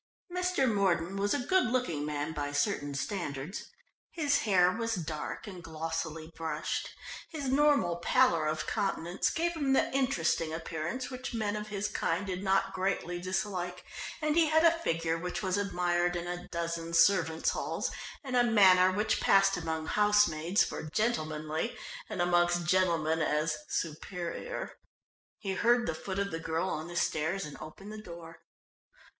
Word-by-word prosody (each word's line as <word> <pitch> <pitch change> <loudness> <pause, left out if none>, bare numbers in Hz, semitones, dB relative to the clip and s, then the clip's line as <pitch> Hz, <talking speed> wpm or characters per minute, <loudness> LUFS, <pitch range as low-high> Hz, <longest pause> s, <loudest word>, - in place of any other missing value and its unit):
Mr. 360 -6 +1
Mordon 195 -4 +1
was 200 +1 0
a 260 -4 -2
good 375 0 +3
looking 245 - 0
man 150 +1 -2
by 145 -2 -3
certain 145 -2 0
standards. 150 0 -4 0.4
His 295 -4 +1
hair 185 -4 +4
was 230 +3 -1
dark 155 0 -4
and 185 -5 -9
glossily 160 0 -4
brushed. 160 -1 -3 0.4
His 290 -5 -4
normal 275 -11 +3
pallor 170 -4 +3
of 155 0 -1
countenance 185 -2 -1
gave 340 +1 0
him 285 -5 +1
the 265 - +2
interesting 180 -12 +1
appearance 165 +10 -4
which 255 -1 -5
men 210 -2 -1
of 210 0 -4
his 205 0 -2
kind 170 +1 -1
did 185 -1 -3
not 195 0 +1
greatly 185 -2 -1
dislike, 180 -1 -3 0.4
and 305 0 +2
he 330 -1 +5
had 315 +1 +4
a 335 - +8
figure 165 - 0
which 180 +5 -4
was 185 -1 +1
admired 175 -3 +1
in 175 0 -3
a 175 0 -5
dozen 170 0 -3
servants' 165 -2 +4
halls, - - -2 0.3
and 260 -2 -3
a 245 - +5
manner 190 -5 +6
which 210 +3 0
passed 195 0 +5
amongst 160 -2 -3
housemaids 205 -4 +3
for - - -4
"gentlemanly," 155 -1 -1 0.3
and 175 - -1
amongst 175 0 +2
gentlemen 170 -3 +2
as 150 0 +1
"superior." 175 - -4 0.6
He 195 -2 -3
heard 240 +4 +3
the 165 - -1
foot 190 +4 -5
of 200 -1 -1
the 165 - -3
girl 165 +3 -1
on 155 +1 -3
the 175 - -8
stairs, 160 +3 0
and 150 - -8
opened 195 +7 -9
the 215 - -7
door. 170 -3 -10
180 Hz, 160 wpm, -31 LUFS, 165-210 Hz, 0.6 s, a